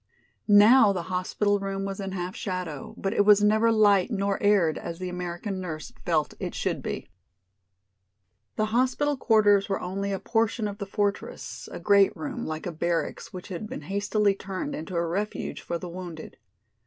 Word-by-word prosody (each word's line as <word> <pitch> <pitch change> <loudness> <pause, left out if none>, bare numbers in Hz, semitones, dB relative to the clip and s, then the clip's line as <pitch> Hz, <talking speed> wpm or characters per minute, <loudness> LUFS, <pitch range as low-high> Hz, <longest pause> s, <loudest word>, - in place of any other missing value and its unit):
Now 210 +2 +7
the 180 -3 -3
hospital 205 +3 +1
room 195 0 -3
was 195 0 -4
in 195 -1 -4
half 180 0 -4
shadow, 180 -7 -5
but 195 - -2
it - - +3
was 205 0 +6
never 220 +2 +4
light 205 -3 +4
nor 200 -3 -1
aired 195 -7 +3
as 170 -1 -6
the 185 0 -4
American 180 +2 -4
nurse 160 -4 -6
felt - - +1
it - - -4
should - - -1
be. - - -5 1.4
The 215 - +1
hospital 260 +4 +2
quarters 205 -5 +4
were 195 - 0
only 195 +2 -3
a 195 - -1
portion 225 +1 0
of 205 +1 -7
the 200 - -4
fortress, 200 0 -3
a - - -6
great 200 -1 +4
room, 275 -5 -4
like 155 0 -4
a 180 - -2
barracks 170 +1 -2
which 185 +1 -9
had 195 +3 -5
been - - -6
hastily 200 +4 +1
turned 195 -1 -5
into 160 +4 -6
a 170 0 +1
refuge 200 +6 -3
for 170 - -3
the 180 - -7
wounded. 170 -3 -8
195 Hz, 180 wpm, -26 LUFS, 180-210 Hz, 1.4 s, Now